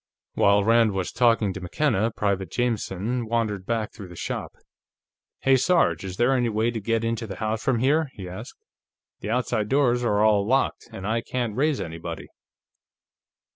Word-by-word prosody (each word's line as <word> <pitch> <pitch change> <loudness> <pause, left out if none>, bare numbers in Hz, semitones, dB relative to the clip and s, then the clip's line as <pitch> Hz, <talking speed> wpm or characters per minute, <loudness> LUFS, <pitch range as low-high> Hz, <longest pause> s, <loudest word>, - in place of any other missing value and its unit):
While 100 0 +4
Rand 115 -1 +4
was 95 -2 -2
talking 115 -4 +2
to 95 - -7
McKenna, 110 - +1
Private 100 -5 -1
Jameson 115 0 -2
wandered 110 -4 -1
back 115 -2 -2
through 100 - -9
the 90 - -12
shop. - - -4 0.9
"Hey, 135 0 +4
Sarge, 170 - +2
is 95 -1 -6
there 120 +3 +3
any 120 -2 +1
way 110 +2 +1
into 115 +1 -1
the 95 - -6
house 110 +2 -2
from 130 -3 +2
here?" 145 +5 +2
he 95 -2 -8
asked. 90 +1 -8 0.6
"The - - -6
outside 110 -3 0
doors 125 -3 +2
are 105 -3 +2
all 105 -2 +4
locked, 130 +2 0
and 100 -4 -7
I 115 +2 0
can't 120 -3 -3
raise 145 +2 +1
anybody." 85 0 -6
115 Hz, 165 wpm, -25 LUFS, 100-120 Hz, 0.9 s, While